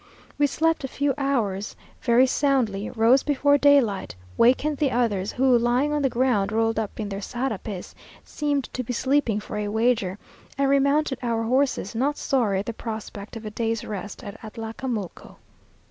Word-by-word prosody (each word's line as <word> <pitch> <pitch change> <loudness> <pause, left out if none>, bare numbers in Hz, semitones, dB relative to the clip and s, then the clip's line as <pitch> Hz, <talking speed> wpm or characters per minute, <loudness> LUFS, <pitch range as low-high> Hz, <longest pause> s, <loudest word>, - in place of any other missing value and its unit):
We 290 - +5
slept 325 +2 0
a - - -2
few 280 +1 0
hours 230 -9 -1 0.3
very 240 +1 +5
soundly, 250 -7 0
rose 240 +3 +4
before 285 0 +2
daylight, 260 - +3 0.2
wakened 280 +5 +3
the 290 -2 +2
others, 220 -6 0
who, 260 -1 +3
lying 245 +5 +2
on 295 - 0
the 270 - +2
ground, 235 -5 +1
rolled 225 0 +1
up 220 0 -5
in 215 - -2
their 200 0 -5
sarapes, 220 -5 -4 0.3
seemed 290 -2 -1
to 255 - -3
be 245 - -4
sleeping 260 -4 +1
for 210 - -6
a 210 0 -2
wager, 220 -3 +1 0.4
and 275 0 +2
remounted 280 0 +2
our 230 -2 -1
horses, 255 -3 0
not 275 +6 0
sorry 230 -8 +1
at - - -9
the 230 - -4
prospect 220 -1 -7
of 225 - -10
a 215 - -5
day's 225 0 -2
rest 210 +3 -6
at 205 -1 -9
Atlacamulco. 225 -2 -6
240 Hz, 170 wpm, -24 LUFS, 215-275 Hz, 0.4 s, We